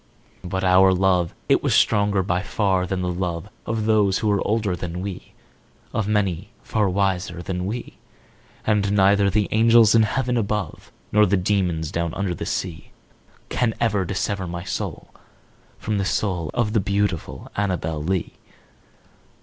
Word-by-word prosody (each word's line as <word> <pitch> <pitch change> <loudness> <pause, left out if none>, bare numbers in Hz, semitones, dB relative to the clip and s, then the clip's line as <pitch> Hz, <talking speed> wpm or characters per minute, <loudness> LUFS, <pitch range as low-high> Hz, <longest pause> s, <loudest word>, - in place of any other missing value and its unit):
But 95 +1 -3
our 95 +1 +6
love 90 -2 +2
it - - +3
was - - +1
stronger 100 -2 +3
by 90 0 0
far 95 -3 0
than 90 0 -2
the 90 - -1
love 90 +1 -3 0.2
Of 110 -1 -1
those 105 -3 +3
who 110 - 0
were 100 -1 +2
older 105 -3 0
than 90 0 -5
we 100 -2 -7 0.6
Of 110 -2 -1
many 100 -3 0
far 105 -3 0
wiser 95 -2 -1
than 90 0 -3
we 115 +4 -5 0.7
And 105 -2 +1
neither 100 0 +4
the 105 +1 +1
angels 115 0 +5
in 115 - +6
heaven 125 +3 0
above, 105 -5 -3 0.2
Nor 105 0 +5
the 100 +2 +2
demons 90 -5 0
down 85 -1 -2
under 95 -2 -1
the - - -5
sea, 85 -4 -4 0.6
Can 115 -3 0
ever 105 -4 +1
dissever 95 +1 -2
my 85 0 -5
soul - - -5 0.7
from 105 -2 -2
the - - 0
soul 90 -6 -1
Of 110 -3 0
the 110 - +3
beautiful 100 -3 -2
Annabel 85 -6 -1
Lee. 95 +2 -1
100 Hz, 155 wpm, -23 LUFS, 90-105 Hz, 0.7 s, our